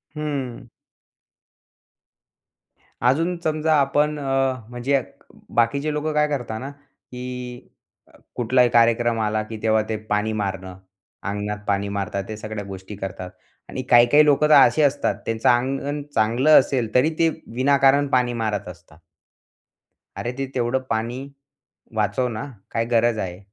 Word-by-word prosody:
हं. 135 -6 -4 2.4
अजून 165 +7 +1
समजा 155 0 +1
आपण 145 +2 +1
अ, 135 -1 +1 0.2
म्हणजे 125 +3 0 0.6
बाकीचे 140 +6 +1
लोकं 150 +1 -2
काय 150 0 +3
करतात 120 -6 -3
ना 135 - -6
की 125 -3 -9 0.7
कुठलाही 125 +1 +3
कार्यक्रम 115 0 +3
आला 110 0 0
की 110 +1 -8
तेव्हा 110 -1 +3
ते 110 - -1
पाणी 105 +1 0
मारणं. 95 -3 -4 0.5
अंगणात 105 +1 -3
पाणी 100 0 0
मारतात. 100 0 -3
ते 110 - -5
सगळ्या 110 -1 -6
गोष्टी 95 +1 -8
करतात 95 -2 -6 0.4
आणि 130 - -4
काही-काही 120 +5 +6
लोकं 150 +1 +4
तर - - +6
असे 155 - +6
असतात 140 -1 +1
त्यांचं 115 0 +1
अंगण 135 +4 0
चांगलं 120 +8 +5
असेल, 125 -5 -1
तरी 130 +5 +4
ते 165 0 +4 0.3
विनाकारण 140 +2 +4
पाणी 125 -3 +1
मारत 110 -4 -2
असतात. 85 -3 -14 1.2
अरे 120 - -3
ते 135 - -1
तेवढं 120 +1 0
पाणी 115 +3 -2 0.8
वाचव 105 +4 0
ना, 110 0 -5 0.3
काय 115 0 0
गरज 115 -1 +2
आहे 90 -2 -4
120 Hz, 135 wpm, -22 LUFS, 110-140 Hz, 2.4 s, काही-काही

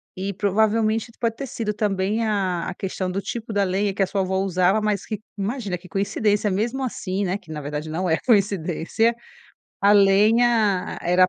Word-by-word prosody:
e 195 +2 -3
provavelmente, 215 +3 +1
pode 230 -1 0
ter 275 +3 -5
sido 220 -3 -3
também 205 +1 0
a 190 -5 0
a 185 - -6
questão, 185 -1 -3
do 190 - -2
tipo 225 +3 -5
da 205 -1 +2
lenha, 195 +2 0
que 195 - +1
a - - +3
sua 195 +1 -1
avó 190 0 -1
usava. 190 +1 +2
Mas 210 -2 -1
que 215 -3 -4 0.2
imagina, 205 -1 -3
que 180 +1 -12
coincidência 205 +2 0
mesmo, 235 +8 -1
assim, 200 -5 -2
né, 185 0 -1
que, 190 -6 -9
na 155 - -4
verdade, 150 +2 -5
não 175 +4 -2
é 160 -1 +2
coincidência, 200 0 +1 0.7
a 200 +1 +5
lenha 210 0 +3
era 180 +1 +4
200 Hz, 185 wpm, -23 LUFS, 185-215 Hz, 0.7 s, a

